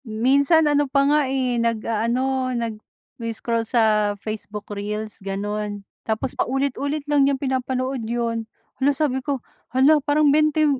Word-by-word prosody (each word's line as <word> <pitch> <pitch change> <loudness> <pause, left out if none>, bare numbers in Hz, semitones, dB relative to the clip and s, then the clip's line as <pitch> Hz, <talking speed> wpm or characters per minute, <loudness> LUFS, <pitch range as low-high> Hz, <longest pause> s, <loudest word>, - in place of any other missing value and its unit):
Minsan 270 +8 +3
ano 290 -1 +2
pa 275 +1 +3
nga 295 +2 +4
eh, 255 -3 0
nag-a-ano, 235 +3 0
nagi-scroll 230 +1 -4
sa 215 -3 +3
Facebook 210 0 -6
reels, 210 +1 -5
ganon. 205 +1 -4 0.2
Tapos 220 +3 -2
paulit-ulit 280 +2 -1
lang 295 -1 +2
niyang 275 - +1
pinapanood 260 -1 -2
'yon. 230 -1 -2 0.3
'La 280 +1 +3
sabi 265 -4 0
ko, 275 -2 -3 0.2
"hala 280 +4 +4
parang 290 0 +3
bente" 305 0 +3
255 Hz, 130 wpm, -23 LUFS, 220-280 Hz, 0.3 s, nga